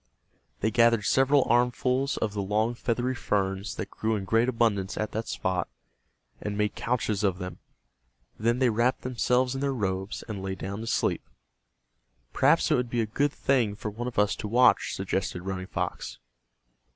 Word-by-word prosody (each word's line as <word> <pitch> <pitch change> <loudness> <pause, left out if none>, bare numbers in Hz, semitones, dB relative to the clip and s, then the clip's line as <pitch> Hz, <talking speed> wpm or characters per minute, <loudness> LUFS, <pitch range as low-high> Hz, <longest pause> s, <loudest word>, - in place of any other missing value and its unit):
They 110 - +1
gathered 115 -2 +4
several 135 +3 +4
armfuls 125 +3 +1
of 105 -2 -1
the 105 - -2
long 105 +4 0
feathery 120 +1 -1
ferns 100 -3 -1
that - - -5
grew 110 0 -1
in 100 -2 -3
great 115 +5 +2
abundance 110 -5 0
at 110 - -2
that 110 +1 -3
spot, 90 -1 -1 0.7
and 105 -1 -3
made 105 0 +1
couches 110 -4 -1
of 95 -3 +1
them. 90 -1 -7 0.8
Then 115 +2 +2
they 125 -2 +3
wrapped 120 +4 +1
themselves 125 0 +1
in 135 - -4
their 140 0 +1
robes 95 -3 -2
and 105 -4 -5
lay 95 0 -3
down 100 +2 -5
to 115 - -6
sleep. - - 0 1.1
"Perhaps - - +3
it - - +5
would 125 -1 -1
be 120 0 0
a - - 0
good 140 +7 0
thing 125 -8 +1
for 105 0 -5
one 120 +4 -5
of 125 - -6
us 105 0 +3
to - - -4
watch," 125 +4 +4
suggested 90 - -2
Running 95 -1 -4
Fox. - - -4
110 Hz, 175 wpm, -27 LUFS, 100-125 Hz, 1.1 s, it